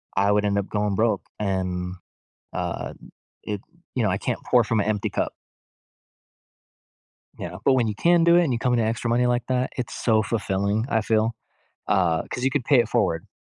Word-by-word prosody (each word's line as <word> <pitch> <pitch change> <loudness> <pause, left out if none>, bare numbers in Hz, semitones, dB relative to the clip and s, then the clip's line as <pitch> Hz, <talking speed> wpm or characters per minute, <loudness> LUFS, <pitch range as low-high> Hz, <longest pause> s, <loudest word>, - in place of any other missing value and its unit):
I 100 +1 +3
would 105 0 +2
end 100 0 +1
up 100 - -4
going 105 -1 0
broke, 110 +1 +1 0.2
and, 90 -2 -2 0.6
uh, - - -3 0.5
it, 105 -1 -4 0.3
you 125 - +1
know 105 - +2
I 90 - 0
can't 120 +3 -3
pour 125 -2 +4
from 110 +1 0
a - - 0
empty 105 -1 -1
cup. - - -1 2.1
Yeah. - - -6
But 135 - +5
when 120 -3 +2
you 105 - -2
can 170 +4 +4
do 170 0 +6
it 175 - +6
and 140 - 0
you 115 - -1
come 125 -1 +1
in 120 - +2
to 110 - +2
extra 115 +1 -1
money 120 +1 +3
like 120 -1 +1
that, 130 0 0
it's 125 -2 -3
so 110 -2 +2
fulfilling, 105 0 -1
I 110 -3 +2
feel, 110 +1 +1 0.5
uh, 90 -5 +2
'cause 125 - -4
you 135 - +2
could 140 -2 0
pay 140 -4 +5
it 115 -2 +1
forward. 85 -10 0
110 Hz, 205 wpm, -24 LUFS, 100-125 Hz, 2.1 s, do